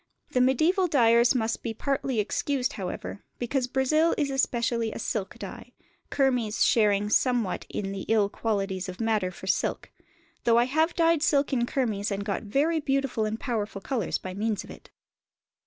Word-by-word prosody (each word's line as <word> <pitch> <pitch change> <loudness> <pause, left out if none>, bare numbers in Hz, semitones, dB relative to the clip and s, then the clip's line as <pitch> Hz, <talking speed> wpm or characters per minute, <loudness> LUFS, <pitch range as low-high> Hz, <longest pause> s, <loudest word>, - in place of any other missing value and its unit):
The 250 - +1
mediæval 320 +9 +3
dyers 235 -2 +4
must 225 -2 -1
be 225 -1 -4
partly 270 -2 -1
excused, 255 +5 -1
however, 195 +1 -5 0.2
because 250 +1 -1
"Brazil" 305 +6 +2
is 285 -3 0
especially 235 -3 0
a - - -6
silk 205 -3 -3
dye, - - -9 0.4
kermes 250 -6 +1
sharing 205 -2 +3
somewhat 245 -6 +1
in 195 -1 -3
the 195 -1 -5
ill 215 -2 +3
qualities 195 -3 -2
of 180 - -8
madder 220 -5 +1
for 185 - -11
silk; - - -1 0.5
though 230 -1 +4
I 240 - +5
have 315 +6 +1
dyed 330 -2 +3
silk 285 -2 +2
in 240 -2 +1
kermes 220 -7 -1
and 200 -1 -3
got 200 -2 -2
very 285 +10 +1
beautiful 275 -6 0
and 215 +1 -3
powerful 215 -5 -3
colours 225 -1 -2
by 185 - -7
means 210 +1 -2
of - - -11
it. - - -13
235 Hz, 170 wpm, -27 LUFS, 210-270 Hz, 0.5 s, I